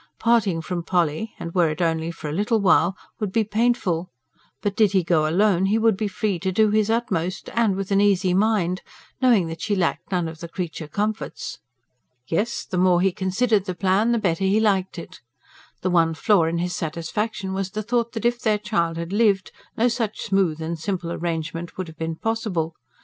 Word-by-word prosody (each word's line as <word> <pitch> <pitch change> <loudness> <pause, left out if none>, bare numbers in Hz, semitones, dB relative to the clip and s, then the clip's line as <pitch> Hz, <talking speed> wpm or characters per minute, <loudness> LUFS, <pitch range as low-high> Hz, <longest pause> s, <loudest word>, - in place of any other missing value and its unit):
Parting 210 -8 +2
from 180 0 -3
Polly, 175 +3 -1
and 170 - -6
were 175 -3 +3
it 155 - -4
only 165 -1 0
for 165 -2 -7
a 150 - -3
little 210 +6 +1
while, 190 -1 +3 0.2
would 210 -4 -2
be 225 +3 +2
painful; 210 -6 0 0.5
but, 205 -1 -1
did 210 -2 +3
he 190 -2 +3
go 160 -3 +2
alone, 195 +1 +3
he 210 +3 +2
would 225 -2 +3
be 215 +2 -2
free 200 -1 -2
to 190 +2 -1
do 215 +2 +3
his 215 0 +2
utmost 190 -6 -1
and 225 -5 +2
with 195 0 -4
an 195 0 +4
easy 195 -3 +3
mind, 190 -3 +1 0.4
knowing 235 -8 +4
that 165 0 -6
she 210 - 0
lacked 180 0 -1
none 175 -3 0
of 160 -1 -8
the 170 - -6
creature 165 -2 -5
comforts. 210 +7 -3 0.7
Yes, 205 - -1
the 180 - -2
more 180 -1 +4
he 190 +1 +3
considered 195 +3 +1
the 185 -2 -3
plan, 195 +5 +2
the 235 - +2
better 190 -4 0
he 195 +3 +3
liked 195 -4 +1
it. 170 - -9 0.6
The 185 - +1
one 165 -2 +3
flaw 200 -3 +3
in 165 +1 -1
his 175 +1 -2
satisfaction 190 +5 -3
was 190 0 -2
the 215 +3 -4
thought 235 +1 0
that 225 -1 -4
if 240 0 +1
their 215 -2 +2
child 190 -6 -1
had 170 +3 -4
lived, 205 -3 +2 0.3
no 235 +2 +3
such 230 -3 -2
smooth 190 -6 +1
and 165 0 -4
simple 175 0 -3
arrangement 170 0 -4
would 185 -2 -3
have 160 -1 -12
been 165 0 -2
possible. 185 -6 -2
190 Hz, 205 wpm, -23 LUFS, 170-215 Hz, 0.7 s, an